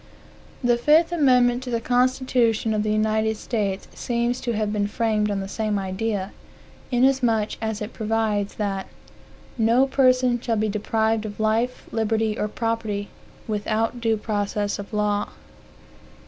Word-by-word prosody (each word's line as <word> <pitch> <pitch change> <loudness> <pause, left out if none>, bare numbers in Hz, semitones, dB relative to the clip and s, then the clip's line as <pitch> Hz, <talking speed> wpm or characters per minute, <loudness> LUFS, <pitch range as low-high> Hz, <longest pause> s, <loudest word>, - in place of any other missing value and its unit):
The 240 -1 +3
fifth 310 +7 +4
amendment 250 -6 +3
to 260 - -6
the 235 -1 0
constitution 245 -2 +1
of 210 - +1
the 215 0 0
United 220 0 +1
States 200 -5 -2
seems 240 +1 -1
to 240 - -2
have 215 -1 -1
been 205 -1 0
framed 215 -1 0
on 200 -1 -1
the 195 - -5
same 215 0 -1
idea, 195 +1 -2 0.6
inasmuch 245 -4 +2
as 220 -1 -2
it 210 - -7
provides 220 -2 -1
that 195 -2 -2 0.7
"no 230 +4 +4
person 255 -2 +3
shall 230 -2 0
be 215 0 0
deprived 220 +1 0
of 210 -1 -7
life, 225 +3 0
liberty, 220 -1 0
or 210 - -1
property, 220 -2 -2 0.4
without 220 +2 -1
due 225 -1 +2
process 205 -1 -2
of 200 - -8
law." 210 -1 0
220 Hz, 145 wpm, -23 LUFS, 210-240 Hz, 0.7 s, fifth